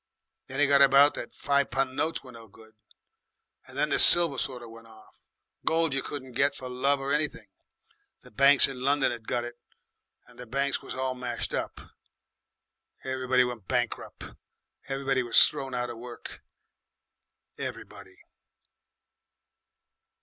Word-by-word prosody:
Then 135 +1 -6
it 145 - +5
got 140 0 +4
about 140 +1 +6
that - - -8
five 140 -1 0
pun' 130 +1 -1
notes 165 +3 -2
were 130 - -13
no 115 -2 -13
good, 110 +2 -19 0.9
and - - -11
then - - +1
the - - +2
silver 170 -6 +6
sort 125 -2 -4
of 115 - -11
went 115 0 -14
off. 110 -1 -19 0.4
Gold 165 -3 +1
you 135 - +1
'couldn't 130 -2 -7
get 140 +3 +1
for 130 - -7
love 135 +3 0
or 135 +1 -2
anything. 150 -7 -2 0.8
The - - -14
banks 140 +5 +6
in 135 -2 -7
London 140 0 +1
'ad 115 -2 -9
got 120 - -1
it, 120 0 -9 0.7
and 120 0 -20
the 125 - -9
banks 140 +3 -1
was - - -8
all 130 0 -2
smashed 125 -2 -5
up. - - -4 1.2
Everybody 130 -1 +1
went 120 -5 -6
bankrup'. 120 -2 -4 0.5
Everybody 135 -1 -1
was 120 -2 +6
thrown 135 -3 -6
out 125 0 -3
of 115 - -10
work. 120 0 -10 1.2
Everybody!" - - -9
130 Hz, 150 wpm, -27 LUFS, 120-140 Hz, 1.2 s, about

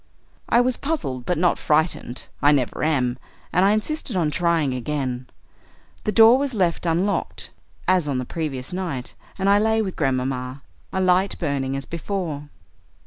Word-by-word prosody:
"I 240 - +5
was 250 0 +1
puzzled, 135 - -3
but 180 - +1
not 175 +1 +2
frightened; 150 -5 0 0.2
I 145 - +6
never 135 -4 0
am, 130 -5 +1 0.3
and 180 - +4
I 195 - +5
insisted 225 +3 -1
on 165 -4 +1
trying 165 -4 +1
again. 130 -1 -3 0.8
The 215 - +1
door 225 +4 +7
was 275 -3 -1
left 175 -3 +1
unlocked, 180 +5 -1 0.4
as 185 -4 +3
on 140 -3 0
the 125 - -2
previous 140 -2 -4
night, 170 -9 -3 0.2
and 195 - 0
I 200 +1 +5
lay 220 +1 +2
with 195 -4 -2
Grandmamma, 130 -1 -1 0.3
a 190 - -1
light 185 +1 +2
burning 140 -4 -1
as 135 - -4
before. 165 -4 -4
165 Hz, 160 wpm, -23 LUFS, 135-195 Hz, 0.8 s, door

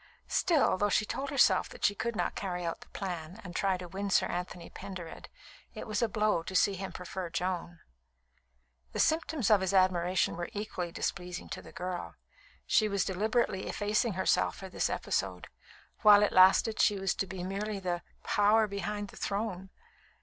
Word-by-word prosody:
Still, 330 - +2
though 205 - +2
she 215 - +2
told 275 +5 -3
herself 230 -9 +4
that - - -3
she 205 - +4
could 235 +3 -3
not - - -1
carry 180 -3 -3
out 165 - -3
the - - -15
plan 180 0 -5
and 180 -2 -9
try 195 -2 +1
to 180 0 -8
win 195 +3 -4
Sir - - +3
Anthony 175 -1 -5
Pendered, 180 -4 -8 0.5
it - - -6
was 215 +1 -2
a 235 - +2
blow 210 -4 +1
to 185 +3 -7
see 200 - +4
him 190 0 -5
prefer 180 0 -6
Joan. 175 0 -3 1.1
The - - -3
symptoms 315 -7 +1
of 205 -2 +6
his 190 +1 0
admiration 185 -2 +2
were 175 0 -4
equally 200 -5 -4
displeasing 180 0 -4
to - - -5
the - - -13
girl. 180 -1 -5 0.5
She 215 -1 +3
was 200 -1 0
deliberately 205 +1 0
effacing 215 +2 0
herself 190 +1 +1
for 190 - -8
this - - -1
episode; - - -2 0.5
while 210 -1 +8
it 210 - +1
lasted, 190 +4 +5
she 205 - +4
was 195 -1 0
to 195 - -2
be 180 -1 -6
merely 200 +3 -3
the 180 -2 -2 0.2
"power 210 +2 +4
behind 205 0 -4
the - - -13
throne." 200 -2 -3
195 Hz, 180 wpm, -31 LUFS, 180-210 Hz, 1.1 s, while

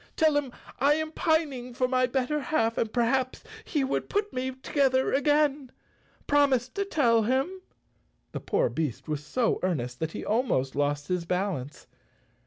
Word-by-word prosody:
Tell 315 -2 +3
him 285 -3 0 0.3
I 285 +3 +4
am 315 0 -3
pining 285 -7 0
for 255 0 +1
my 255 0 +2
bet¬ 250 0 -1
ter 300 0 0
half 230 -6 0
and 225 - -1
perhaps 255 +2 0 0.2
he 295 -9 -1
would 265 - -2
put 415 0 -1
me 255 +1 -2
together 260 0 +1
again. 285 -1 +2 0.5
Promise 275 -4 +3
to 400 +9 -3
tell 240 - +3
him." 270 - 0 0.7
The - - -4
poor - - +1
beast 135 -5 -3
was 150 -1 -3
so 230 +10 0
earnest 125 -9 -2
that 160 0 -3
he - - -6
almost 210 - 0
lost 145 0 0
his 180 -2 -1
balance. 180 -7 -3
255 Hz, 165 wpm, -27 LUFS, 185-290 Hz, 0.7 s, I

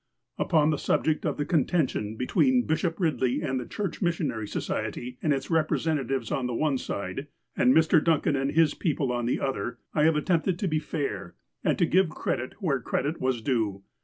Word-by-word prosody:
Upon 155 -3 +3
the 150 - -1
subject 155 +1 +1
of 150 - -2
the 145 - -1
contention 145 - 0
between 250 - +2
Bishop 165 +1 0
Eidley 150 -8 0
and 130 0 -1
the 120 - -6
Church 200 -2 -4
Missionary 160 - -1
Society 125 +4 -4
and 155 - +1
its 135 -1 -1
repre 160 -2 +2
sentatives 135 -7 -1
on 130 -3 -1
the 125 - -3
one 140 -1 +1
side, 100 +9 -4 0.3
and 125 - +4
Mr. 160 +1 +4
Duncan 155 -3 +2
and 135 +1 -1
his 160 -1 +4
people 145 -6 -1
on 120 -1 -1
the - - 0
other, 120 -4 -2 0.2
I 150 -1 +3
have 160 -1 +4
attempted 170 +3 +1
to 195 - -1
be 155 -2 +1
fair, 135 - -4 0.3
and - - +2
to - - +3
give 185 +1 +3
credit 130 -4 -3
where 155 -10 0
credit 145 +7 -2
was 130 -3 0
due. 110 -7 0
145 Hz, 190 wpm, -27 LUFS, 125-160 Hz, 0.3 s, and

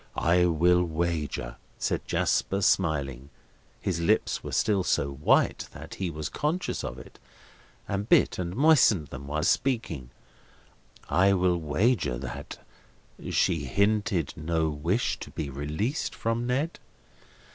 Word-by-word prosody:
"I 90 +1 +3
will 90 +2 +3
wager," 80 -6 -2 0.2
said - - -2
Jasper, 100 +1 0
smiling—his 75 +2 -2
lips 85 - +1
were - - -6
still 100 -3 +2
so 70 -5 0
white 70 +3 +2
that - - -9
he 95 -2 -3
was 80 -2 -4
conscious 160 +5 -2
of - - -5
it, - - -13 0.7
and 100 +3 -3
bit - - +4
and 90 0 -3
moistened 125 - +4
them 70 +2 -8
while 75 +2 -2
speaking: 85 - 0 1.0
"I 95 +2 +4
will 90 -2 +2
wager 80 - +1
that 65 -1 -7 0.7
she 85 -6 +1
hinted 100 -1 +1
no 80 0 0
wish 85 +11 -1
to - - -8
be 75 -4 -5
released 75 - -2
from 115 +1 -1
Ned." 140 +7 -1
85 Hz, 125 wpm, -27 LUFS, 75-100 Hz, 1.0 s, bit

